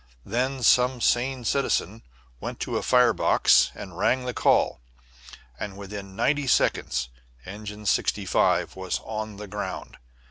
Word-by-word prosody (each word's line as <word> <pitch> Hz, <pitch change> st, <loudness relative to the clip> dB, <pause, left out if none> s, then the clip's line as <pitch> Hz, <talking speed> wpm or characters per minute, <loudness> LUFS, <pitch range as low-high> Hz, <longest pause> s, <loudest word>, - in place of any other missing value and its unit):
Then 130 Hz, +4 st, -2 dB
some 125 Hz, +1 st, +4 dB
sane 125 Hz, +1 st, +1 dB
citizen 115 Hz, -5 st, 0 dB, 0.4 s
went -, -, -6 dB
to -, -, -3 dB
a -, -, 0 dB
fire 125 Hz, -2 st, +4 dB
box 85 Hz, -, +4 dB
and -, -, -9 dB
rang 130 Hz, 0 st, +1 dB
the 125 Hz, -, -3 dB
call, 60 Hz, -, +2 dB, 0.8 s
and 100 Hz, -2 st, -6 dB
within 100 Hz, -1 st, -8 dB
ninety 145 Hz, +5 st, +1 dB
seconds 65 Hz, -, +1 dB, 0.4 s
Engine 105 Hz, +1 st, -8 dB
65 100 Hz, -2 st, +1 dB
was 95 Hz, -1 st, -3 dB
on 110 Hz, -1 st, -5 dB
the 105 Hz, -, -7 dB
ground. 100 Hz, -2 st, -6 dB
110 Hz, 135 wpm, -25 LUFS, 100-125 Hz, 0.8 s, some